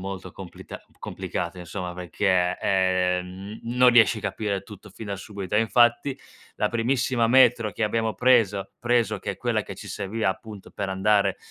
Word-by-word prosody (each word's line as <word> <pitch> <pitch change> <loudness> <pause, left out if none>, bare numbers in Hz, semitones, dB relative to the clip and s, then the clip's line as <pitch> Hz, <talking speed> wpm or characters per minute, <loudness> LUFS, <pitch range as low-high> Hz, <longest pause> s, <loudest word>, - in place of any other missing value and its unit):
molto 95 -1 -7
complita 95 -3 -10 0.2
complicata, 85 +1 -5
insomma, 90 +1 -6
perché, 90 0 0
ehm, 95 +1 0
m 120 +1 -5
non 125 0 +7
riesci 120 -1 +5
capire 100 -1 -3
tutto 105 0 -13
fin 110 +3 -10
da 100 - -3
subito; 100 0 -6
e 105 - +5
infatti, 120 +4 +2 0.4
la 105 - +1
primissima 120 0 +1
metro 125 -3 +5
che 115 - -1
abbiamo 110 +1 0
preso 115 -6 +2
preso, 115 -4 +1
che - - -3
è - - -12
quella - - -1
che - - -9
ci - - -10
serviva 105 +1 -2
appunto 100 +1 -9
per 100 - -4
andare 100 +2 +2
105 Hz, 165 wpm, -25 LUFS, 95-115 Hz, 0.4 s, non